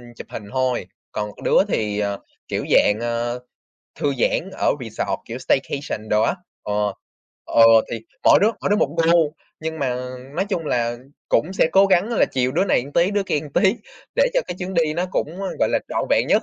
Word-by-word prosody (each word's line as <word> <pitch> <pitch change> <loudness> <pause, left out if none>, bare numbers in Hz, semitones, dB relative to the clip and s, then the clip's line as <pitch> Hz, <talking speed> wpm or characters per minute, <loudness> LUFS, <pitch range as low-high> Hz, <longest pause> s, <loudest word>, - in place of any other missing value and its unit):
chụp - - -10
hình 105 - -7
thôi, 130 -7 0 0.2
còn 105 -1 -3
đứa - - +3
thì, 105 - -1
ờ, 100 -1 -1 0.3
kiểu - - -2
dạng, 105 +2 +4
ờ, 120 +1 -2 0.6
thư 145 -1 +1
giãn 180 +9 0
ở - - +1
resort, 115 -2 -3
kiểu 120 +2 -6
staycation 135 -5 -2
đồ 105 0 +3
á, 175 - +2 0.3
ừ, 105 - -3 0.7
ừ, 115 - +3 0.3
thì 115 - -3 0.2
mỗi - - +7
đứa 205 - +5
mỗi - - 0
đứa 205 - +4
một 160 -6 0 0.2
gu. 160 -3 +3 0.3
Nhưng 160 0 -4
mà, 130 -3 0 0.4
nói 190 +3 0
chung 170 -5 -2
là, 120 -3 0 0.3
cũng 180 +5 +1
sẽ 160 - +3
cố 195 +1 +6
gắng 190 +3 +3
là 235 - +3
chiều 130 -1 +1
đứa 180 +6 +1
này 130 -8 +2
một 145 - -11
tí, 175 +4 +3
đứa 205 -1 +1
kia 150 - 0
một 150 - -9
tí 195 +2 +4 0.4
để - - +4
cho - - +3
cái 175 - -4
chuyến 185 +1 -4
đi 160 -3 +2
nó 175 +2 -1
cũng 170 +5 -2 0.2
gọi - - +3
là - - +2
trọn - - -1
vẹn - - +3
nhất. - - +4
145 Hz, 210 wpm, -22 LUFS, 120-180 Hz, 0.7 s, mỗi